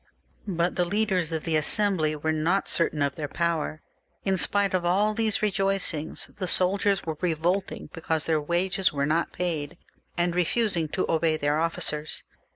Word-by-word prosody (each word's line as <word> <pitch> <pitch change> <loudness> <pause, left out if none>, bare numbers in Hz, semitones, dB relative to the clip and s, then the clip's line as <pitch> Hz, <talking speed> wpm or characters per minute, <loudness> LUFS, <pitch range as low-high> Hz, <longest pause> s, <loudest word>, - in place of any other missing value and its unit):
But 175 -2 0
the 180 - +3
leaders 185 -3 0
of 160 -1 -2
the 165 -2 0
Assembly 155 -1 +2
were 160 +1 -1
not 165 +5 +1
certain 155 -3 +1
of 140 -1 -1
their 150 -2 -4
power 165 -1 -2 0.4
in 195 -1 +1
spite 200 +2 +2
of 185 -2 +1
all 200 +5 +2
these 220 -1 0
rejoicings; 195 -6 -1
the 185 - -2
soldiers 195 +2 +2
were 160 -2 -3
revolting 180 +3 -1
because 160 -2 -2
their 160 -2 +1
wages 180 +4 +1
were 140 -1 -1
not 160 +3 0
paid, 170 -2 -3 0.4
and 175 0 +1
re 180 0 +2
fusing 175 -6 +1
to - - +1
obey 160 -1 +1
their 145 0 +1
ofi&cers. 155 -2 -1
170 Hz, 165 wpm, -26 LUFS, 155-195 Hz, 0.4 s, the